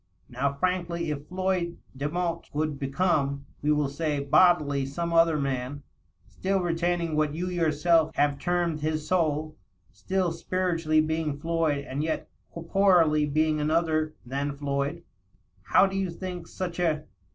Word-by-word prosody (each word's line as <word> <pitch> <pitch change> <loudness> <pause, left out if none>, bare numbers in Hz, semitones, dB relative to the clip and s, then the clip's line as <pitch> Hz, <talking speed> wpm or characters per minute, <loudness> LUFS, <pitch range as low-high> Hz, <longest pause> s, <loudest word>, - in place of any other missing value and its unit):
Now, 135 +2 0
frankly, 170 0 -1
if 145 0 -5
Floyd 185 -2 -1 0.2
Demotte 165 +5 -2
coul^ 150 -1 -2
become, 140 -1 0 0.2
we 150 - +2
will 150 -1 +2
say, 145 +1 -2
bodily 145 -1 +4
some 170 +5 -3
other 165 -1 +5
man, 140 0 -3 0.4
still 195 +1 -1
retaining 170 -1 0
what 150 -1 +1
you 175 +3 -2
yourself 165 -1 +2
have 145 -1 +2
termed 175 -1 0
his 155 0 -2
soul 155 -3 0 0.2
— - - -44
still 180 - -1
spiritually 165 -2 +1
being 155 -2 -1
Floyd 160 -2 0
and 135 +2 -3
yet 160 0 -2 0.2
corporally 170 -3 +3
being 155 +1 +1
another 155 0 +1
than 140 +3 -3
Floyd, 140 +3 -2 0.6
how - - +5
do 195 0 -3
you 195 -1 0
think 175 -1 -6
such 180 -2 -5
a 155 -3 +1
155 Hz, 140 wpm, -27 LUFS, 145-175 Hz, 0.6 s, other